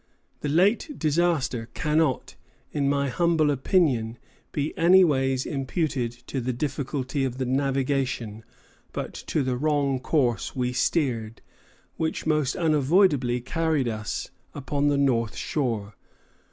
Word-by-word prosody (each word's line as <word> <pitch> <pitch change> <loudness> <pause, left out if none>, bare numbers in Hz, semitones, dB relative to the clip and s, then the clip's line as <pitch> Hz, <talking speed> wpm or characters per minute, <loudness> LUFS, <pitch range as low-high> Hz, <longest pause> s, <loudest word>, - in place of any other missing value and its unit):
"The 145 - -3
late 205 - +2
disaster 150 -7 0
cannot, 155 -3 0 0.4
in 140 -2 0
my 140 -1 +1
humble 160 0 +2
opinion, 130 - +1 0.3
be 150 +1 -2
anyways 150 -8 +4
imputed 135 -3 -1
to 135 - -3
the 125 +2 -1
difficulty 135 +1 -2
of 130 -1 -2
the 130 - -1
navigation, 130 -4 -1 0.5
but - - -4
to 150 - -2
the 130 -1 -1
wrong 140 -2 +1
course 125 -4 0
we 125 -1 -1
steered, 120 -4 -1 0.5
which 160 0 -2
most 150 -4 +1
unavoidably 150 -5 +3
carried 155 0 0
us 110 -2 -4 0.2
upon 145 +1 -1
the 145 -1 +2
north 120 -5 +1
shore. 115 -8 -2
140 Hz, 120 wpm, -25 LUFS, 125-155 Hz, 0.5 s, anyways